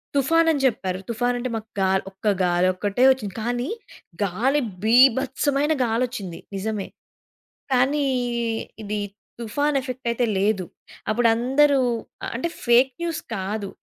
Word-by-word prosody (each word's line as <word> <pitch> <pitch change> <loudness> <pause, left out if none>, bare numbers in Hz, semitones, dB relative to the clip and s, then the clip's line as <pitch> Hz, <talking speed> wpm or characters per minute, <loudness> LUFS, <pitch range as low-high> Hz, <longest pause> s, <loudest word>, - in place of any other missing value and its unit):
తుఫానని 320 +2 +3
జెప్పారు. 185 -7 0
తుఫాను 245 +2 0
అంటే 255 +1 -3
మాకు 220 0 -6
గా 190 - +3 0.2
ఒక్క 195 +3 -6 0.2
గాలి 175 0 +2
ఒక్కటే 205 +6 0
వచ్చింది. 215 -7 -2
కానీ 245 +3 -2 0.5
గాలి 240 +10 +1 0.2
బీభత్సమైన 265 +5 +3
గాలి 230 +1 0
ఒచ్చింది 190 -8 -7 0.2
నిజమే. 205 0 -3 0.9
కానీ 275 +3 +2 0.8
ఇది 210 0 -3 0.4
తుఫాను 285 +6 0
ఎఫెక్ట్ 255 -1 -6
అయితే 240 +1 0
లేదు. 195 -2 +1 0.4
అప్పుడు 230 +2 +3
అందరూ 270 +4 +3 0.6
అంటే, 300 +9 -2 0.2
ఫేక్ 250 +2 +5
న్యూస్ 335 -2 -2 0.2
కాదు. 200 +1 -3
240 Hz, 120 wpm, -23 LUFS, 210-270 Hz, 0.9 s, ఫేక్